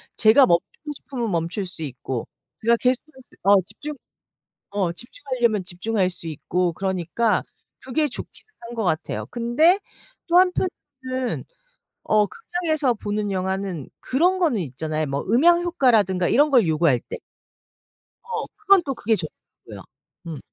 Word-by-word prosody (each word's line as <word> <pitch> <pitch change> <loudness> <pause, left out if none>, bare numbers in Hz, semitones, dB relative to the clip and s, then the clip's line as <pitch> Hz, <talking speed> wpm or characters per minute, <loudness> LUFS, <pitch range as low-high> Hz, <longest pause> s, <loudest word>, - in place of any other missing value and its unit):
제가 235 +5 +6
멈추고 235 - -1
싶으면 240 -7 -4
멈출 170 +4 -1
수 175 -3 -10
있고 130 -3 -4 0.4
제가 235 +1 +5
계속해서 260 +2 -1 0.2
어 200 +1 +6
집중 295 +10 -8 0.8
어 195 -4 0
집중하려면 240 -1 -1
집중할 185 +2 -1
수 170 - -10
있고 175 +3 -1
그러니까 190 +5 0 0.4
그게 295 +4 0
좋기는 350 - -10 0.2
한 240 - -7
것 225 - -2
같아요. 160 -4 -1
근데 255 +11 +3 0.5
또 350 +1 +5
한편으로는 260 -9 -2 0.6
어 210 -1 +3
극장에서 310 - -1
보는 205 -1 -3
영화는 190 -4 -2
그런 355 +8 +2
거는 295 - +2
있잖아요, 155 +2 -3
뭐 140 +1 -2
음향 340 +10 +5
효과라든가 220 - +2
이런 290 +2 +4
걸 230 -10 +5
요구할 155 -6 +3
때. - - -7 1.1
어. 455 -1 -3
그건 395 -3 +5
또 270 - -1
그게 225 -2 +1
좋더라고요. 160 -5 -10 0.4
음. 155 -4 -5
225 Hz, 295 characters per minute, -23 LUFS, 180-280 Hz, 1.1 s, 제가